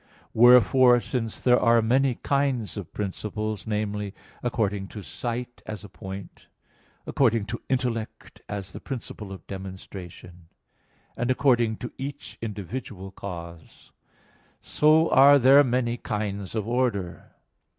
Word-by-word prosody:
Wherefore 125 Hz, +1 st, +6 dB
since 115 Hz, -2 st, -3 dB
there 125 Hz, -1 st, +4 dB
are 115 Hz, +1 st, +4 dB
many 125 Hz, +3 st, +2 dB
kinds 140 Hz, -6 st, -1 dB
of 100 Hz, -6 st, -7 dB
principle 105 Hz, +2 st, -3 dB
namely, 105 Hz, -1 st, -2 dB, 0.3 s
according 105 Hz, -5 st, -1 dB
to 105 Hz, 0 st, -9 dB
site, 120 Hz, +4 st, -5 dB
as 110 Hz, -1 st, -6 dB
a 105 Hz, -, -10 dB
point; 95 Hz, +2 st, -9 dB, 0.6 s
according 115 Hz, -5 st, +2 dB
to 110 Hz, +2 st, -5 dB
intellect, 125 Hz, -4 st, -3 dB
as 100 Hz, -3 st, -5 dB
the -, -, -7 dB
principle 110 Hz, -6 st, -7 dB
of 95 Hz, -, -9 dB
demonstration; 95 Hz, -2 st, -9 dB, 0.7 s
and 120 Hz, -, -2 dB
according 120 Hz, -4 st, +2 dB
to 120 Hz, -, -7 dB
each 140 Hz, +1 st, -7 dB
individual 105 Hz, -2 st, -6 dB
cause 85 Hz, -4 st, -9 dB, 0.7 s
so 155 Hz, +2 st, +3 dB
are 140 Hz, +2 st, +8 dB
there 135 Hz, +2 st, +7 dB
many 120 Hz, -2 st, 0 dB
kinds 100 Hz, -2 st, -4 dB
of 110 Hz, -1 st, -2 dB
order. 120 Hz, -8 st, -2 dB
110 Hz, 120 wpm, -26 LUFS, 100-125 Hz, 0.7 s, are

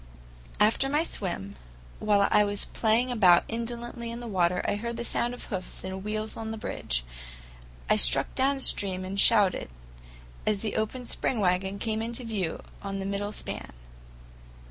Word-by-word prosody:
After 220 Hz, +6 st, +3 dB
my 300 Hz, +3 st, +2 dB
swim, 175 Hz, -, -3 dB, 0.4 s
while 205 Hz, -1 st, +3 dB
I 210 Hz, -, +5 dB
was 205 Hz, -1 st, -1 dB
playing 230 Hz, +3 st, +1 dB
about 185 Hz, -7 st, +5 dB
indolently 235 Hz, +1 st, -4 dB
in 235 Hz, +1 st, -6 dB
the 240 Hz, -, -8 dB
water, 180 Hz, -3 st, +1 dB
I -, -, +1 dB
heard 235 Hz, +2 st, -4 dB
the 235 Hz, -, -3 dB
sound 240 Hz, +1 st, 0 dB
of -, -, -9 dB
hoofs 185 Hz, -4 st, -6 dB
and 190 Hz, 0 st, -5 dB
wheels 215 Hz, +1 st, -3 dB
on 225 Hz, -1 st, -5 dB
the 220 Hz, -, -4 dB
bridge. -, -, -3 dB, 0.8 s
I -, -, +3 dB
struck -, -, +4 dB
downstream 260 Hz, -9 st, +4 dB
and 195 Hz, +1 st, -4 dB
shouted, 205 Hz, -, +4 dB, 0.7 s
as 215 Hz, -, +1 dB
the 215 Hz, -, -3 dB
open 230 Hz, +4 st, -2 dB
spring 240 Hz, 0 st, -1 dB
wagon 190 Hz, +1 st, +1 dB
came 220 Hz, +1 st, -2 dB
into 235 Hz, +2 st, -4 dB
view 200 Hz, -8 st, -3 dB, 0.2 s
on 195 Hz, -1 st, -4 dB
the 195 Hz, -, -4 dB
middle 200 Hz, +1 st, -3 dB
span. -, -, -6 dB
215 Hz, 165 wpm, -27 LUFS, 190-235 Hz, 0.8 s, I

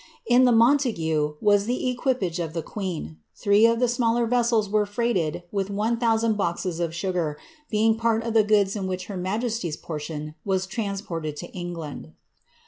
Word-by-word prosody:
In 245 Hz, +1 st, +5 dB
the 250 Hz, -, +5 dB
Montague 220 Hz, -, +2 dB
was 205 Hz, -1 st, +4 dB
the 250 Hz, +1 st, -1 dB
equipage 245 Hz, -, -1 dB
of 165 Hz, -2 st, -3 dB
the 165 Hz, -2 st, -3 dB
queen 165 Hz, -, -5 dB
*, -, -, -49 dB
three 205 Hz, +2 st, +4 dB
of 230 Hz, 0 st, +1 dB
the 250 Hz, -, +3 dB
smaller 235 Hz, -1 st, +1 dB
veswli 235 Hz, -3 st, +2 dB
were 210 Hz, 0 st, +1 dB
freighted 200 Hz, -7 st, -1 dB
witli 195 Hz, -1 st, -1 dB
one 215 Hz, +4 st, 0 dB
thousand 225 Hz, -2 st, +2 dB
boxes 175 Hz, -2 st, -2 dB
of 170 Hz, -1 st, -2 dB
sugar, 175 Hz, -5 st, -1 dB, 0.3 s
being 220 Hz, 0 st, +3 dB
part 230 Hz, 0 st, +1 dB
of 230 Hz, -1 st, -2 dB
the 225 Hz, -, +6 dB
goods 205 Hz, -1 st, +2 dB
in 195 Hz, -2 st, -3 dB
which 185 Hz, 0 st, -3 dB
her 200 Hz, -, -7 dB
inajesty^s 200 Hz, -1 st, -2 dB
portion 150 Hz, -1 st, -6 dB
was 190 Hz, -2 st, 0 dB
transported 190 Hz, -8 st, -4 dB
to -, -, -8 dB
Englind. 165 Hz, -, -7 dB
200 Hz, 175 wpm, -25 LUFS, 170-230 Hz, 0.3 s, the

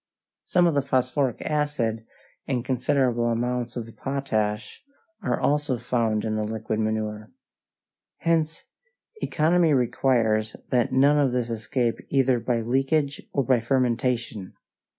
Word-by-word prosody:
Some 180 Hz, -1 st, +3 dB
of 170 Hz, -, +3 dB
the 140 Hz, -, +2 dB
phosphoric 130 Hz, -1 st, 0 dB
acid 145 Hz, -8 st, -1 dB, 0.4 s
and 125 Hz, -2 st, -1 dB
considerable 125 Hz, -2 st, +1 dB
amounts 120 Hz, +1 st, -1 dB
of 120 Hz, -, -4 dB
the 115 Hz, -, -12 dB
potash 110 Hz, -6 st, -2 dB, 0.4 s
are -, -, -1 dB
also 145 Hz, -3 st, +1 dB
found 115 Hz, -3 st, 0 dB
in 110 Hz, -1 st, -1 dB
the 110 Hz, -, 0 dB
liquid 110 Hz, 0 st, -3 dB
manure. 110 Hz, -1 st, -2 dB, 0.9 s
Hence 165 Hz, -1 st, 0 dB, 0.6 s
economy 165 Hz, +1 st, +3 dB
requires 115 Hz, -3 st, +1 dB
that 125 Hz, -2 st, +1 dB
none 140 Hz, +3 st, +4 dB
of 135 Hz, -4 st, +2 dB
this 120 Hz, -2 st, -1 dB
escape 115 Hz, +1 st, -1 dB
either 130 Hz, -3 st, +3 dB
by 115 Hz, 0 st, 0 dB
leakage 135 Hz, +4 st, 0 dB
or 140 Hz, -, +1 dB
by 125 Hz, 0 st, +3 dB
fermentation. 120 Hz, -4 st, -1 dB
125 Hz, 130 wpm, -25 LUFS, 115-140 Hz, 0.9 s, none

